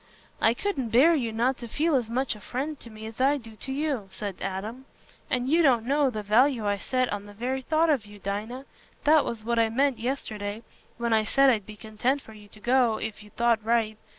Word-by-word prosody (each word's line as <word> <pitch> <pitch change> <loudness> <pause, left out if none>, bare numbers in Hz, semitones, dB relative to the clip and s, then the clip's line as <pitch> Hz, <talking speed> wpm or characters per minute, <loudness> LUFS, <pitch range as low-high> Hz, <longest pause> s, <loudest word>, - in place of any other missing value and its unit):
"I 225 +1 +4
couldn't 275 - -2
bear 270 +10 +6
you 245 -8 0
not 240 +4 0
to 235 - -7
feel 310 +8 0
as 240 -4 0
much 250 0 -1
a - - -12
friend 275 +8 -4
to 235 - -11
me 215 0 -10
as 225 +3 -7
I 280 +2 +4
do 225 -4 -12
to 265 - -6
you," 275 -7 -2
said 195 -1 -5
Adam. 210 +7 -5 0.4
"And 250 0 0
you 325 +5 +4
don't 245 -7 +4
know 280 +1 +2
the 215 -4 -5
value 230 +2 +3
I 205 0 +1
set 255 +3 -1
on 205 0 -5
the 205 - -11
very 255 +4 -2
thought 315 +4 +2
of 245 -8 0
you, 205 0 -12
Dinah. 210 +7 -4 0.4
That 305 0 +5
was 225 -2 -4
what 235 +1 0
I 225 -1 +3
meant 265 +2 +1
yesterday, 220 -4 -4 0.3
when 235 -1 0
I 220 -1 +4
said 275 +4 +4
I'd 215 -5 -1
be 215 - -9
content 220 +6 -1
for 220 - -13
you 210 -1 -14
to 210 - -17
go, 240 -1 +3
if 220 -1 -5
you 210 - -14
thought 235 -1 +1
right. 225 -1 +1
235 Hz, 235 wpm, -27 LUFS, 215-265 Hz, 0.4 s, bear